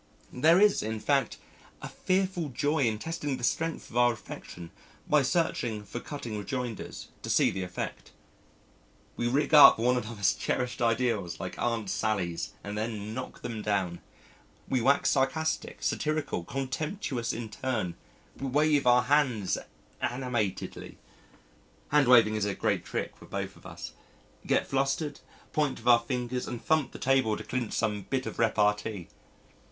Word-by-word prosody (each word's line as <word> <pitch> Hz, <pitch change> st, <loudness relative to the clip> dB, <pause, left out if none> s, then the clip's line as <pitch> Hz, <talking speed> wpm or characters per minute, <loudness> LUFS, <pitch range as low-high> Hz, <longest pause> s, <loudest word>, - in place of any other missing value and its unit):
There 160 Hz, +8 st, +5 dB
is, 210 Hz, 0 st, +5 dB
in 110 Hz, 0 st, -3 dB
fact, 135 Hz, +6 st, +1 dB, 0.4 s
a -, -, -6 dB
fearful 185 Hz, -4 st, -1 dB
joy 145 Hz, +2 st, +1 dB
in 110 Hz, -2 st, +1 dB
testing 145 Hz, +1 st, -3 dB
the 125 Hz, -, -9 dB
strength 165 Hz, +5 st, -1 dB
of 120 Hz, -, -4 dB
our 120 Hz, 0 st, +5 dB
affection 90 Hz, -5 st, -10 dB, 0.4 s
by 150 Hz, -1 st, +4 dB
searching 130 Hz, -6 st, 0 dB
for 105 Hz, +4 st, -6 dB
cutting 120 Hz, -6 st, -6 dB
rejoinders 125 Hz, -1 st, -5 dB
to -, -, -6 dB
see -, -, +4 dB
the 95 Hz, -, -4 dB
effect. 90 Hz, -9 st, -5 dB, 1.0 s
We 120 Hz, -, -1 dB
rig 140 Hz, +5 st, +1 dB
up 145 Hz, -2 st, +10 dB
one 125 Hz, +2 st, +2 dB
another's 110 Hz, -4 st, 0 dB
cherished 125 Hz, -1 st, -2 dB
ideals 115 Hz, -7 st, 0 dB
like -, -, -6 dB
Aunt 115 Hz, -3 st, -1 dB
Sallies 85 Hz, -7 st, -1 dB
and 105 Hz, 0 st, -5 dB
then 110 Hz, -1 st, -3 dB
knock 130 Hz, +2 st, -7 dB
them 115 Hz, -3 st, -4 dB
down, 95 Hz, -5 st, -1 dB, 0.7 s
we 130 Hz, -, +1 dB
wax 140 Hz, +4 st, +3 dB
sarcastic, 160 Hz, +4 st, -1 dB
satirical, 155 Hz, -, -1 dB
contemptuous 135 Hz, -, -3 dB
in 115 Hz, -1 st, -5 dB
turn, 110 Hz, -5 st, -2 dB, 0.4 s
we 135 Hz, -, -4 dB
wave 145 Hz, 0 st, +2 dB
our 125 Hz, 0 st, +6 dB
hands 125 Hz, -8 st, +2 dB, 0.5 s
animatedly 120 Hz, -6 st, -3 dB, 0.9 s
(hand 145 Hz, -3 st, +4 dB
waving 115 Hz, -4 st, +7 dB
is 105 Hz, -1 st, 0 dB
a 100 Hz, -2 st, -1 dB
great -, -, 0 dB
trick -, -, -4 dB
with -, -, -13 dB
both -, -, -4 dB
of -, -, -13 dB
us), -, -, -8 dB, 0.6 s
get -, -, +2 dB
flushed, 135 Hz, +2 st, -1 dB, 0.3 s
point 150 Hz, -3 st, +1 dB
with 115 Hz, -, -13 dB
our 120 Hz, -1 st, +8 dB
fingers, 125 Hz, +1 st, -3 dB
and 120 Hz, -, -4 dB
thump 155 Hz, -5 st, +2 dB
the -, -, -9 dB
table 130 Hz, -5 st, +2 dB
to -, -, -7 dB
clinch 125 Hz, -3 st, -3 dB
some 105 Hz, -3 st, -1 dB
bit 130 Hz, -1 st, -1 dB
of -, -, -6 dB
repartee. 105 Hz, -4 st, +1 dB
120 Hz, 155 wpm, -29 LUFS, 110-140 Hz, 1.0 s, up